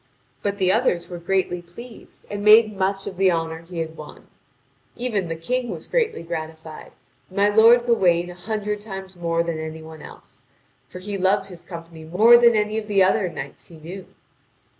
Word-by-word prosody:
But 200 Hz, 0 st, -2 dB
the 185 Hz, -2 st, +2 dB
others 175 Hz, -2 st, +1 dB
were 175 Hz, -1 st, -7 dB
greatly 180 Hz, 0 st, -1 dB
pleased, 220 Hz, +8 st, -14 dB
and 205 Hz, 0 st, -4 dB
made 215 Hz, 0 st, +6 dB
much 195 Hz, 0 st, -1 dB
of 190 Hz, -, -7 dB
the 190 Hz, -1 st, +4 dB
honour 165 Hz, -1 st, -2 dB
he 170 Hz, +1 st, -11 dB
had 160 Hz, -1 st, -4 dB
won. 155 Hz, -1 st, -12 dB, 0.7 s
Even 220 Hz, -7 st, -2 dB
the 165 Hz, -, -3 dB
King 245 Hz, +9 st, -2 dB
was 170 Hz, -6 st, -6 dB
greatly 460 Hz, -, -1 dB
gratified, 160 Hz, -1 st, -7 dB, 0.4 s
and 190 Hz, -, -13 dB
my 200 Hz, +1 st, +4 dB
lord 230 Hz, +3 st, +6 dB
Gawain 180 Hz, -7 st, +2 dB
a -, -, -9 dB
hundred 210 Hz, +3 st, -4 dB
times 190 Hz, -3 st, -8 dB
more 170 Hz, -1 st, 0 dB
than 170 Hz, -2 st, -3 dB
any 160 Hz, 0 st, -7 dB
one 160 Hz, -1 st, -11 dB
else. -, -, -14 dB, 0.4 s
For -, -, -11 dB
he 200 Hz, +2 st, -5 dB
loved 190 Hz, +1 st, +1 dB
his 175 Hz, -2 st, -11 dB
company 165 Hz, -2 st, -10 dB
more 210 Hz, +9 st, +6 dB
than 235 Hz, 0 st, +6 dB
that 215 Hz, -, +3 dB
of -, -, 0 dB, 0.2 s
any 200 Hz, -2 st, +4 dB
other 190 Hz, 0 st, +2 dB
knight 165 Hz, -, -8 dB
he 170 Hz, -, -14 dB
knew. 175 Hz, +5 st, -9 dB
185 Hz, 190 wpm, -22 LUFS, 170-210 Hz, 0.7 s, made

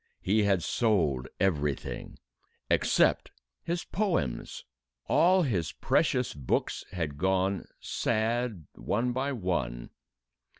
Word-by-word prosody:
He 105 Hz, +3 st, +3 dB
had 95 Hz, -4 st, +2 dB
sold 80 Hz, -, +1 dB
everything 75 Hz, -7 st, -1 dB, 0.5 s
except -, -, +3 dB, 0.3 s
his 170 Hz, +1 st, -2 dB
poems. 185 Hz, -, -2 dB, 0.4 s
All 185 Hz, +2 st, +4 dB
his 90 Hz, -, -1 dB
precious 125 Hz, -1 st, +1 dB
books 70 Hz, -4 st, -1 dB
had 75 Hz, -5 st, -3 dB
gone, 95 Hz, +1 st, +1 dB, 0.2 s
sad 115 Hz, -4 st, -1 dB
one 125 Hz, +1 st, -1 dB
by 130 Hz, +3 st, -1 dB
one. 80 Hz, -, -2 dB
95 Hz, 95 wpm, -29 LUFS, 75-125 Hz, 0.5 s, All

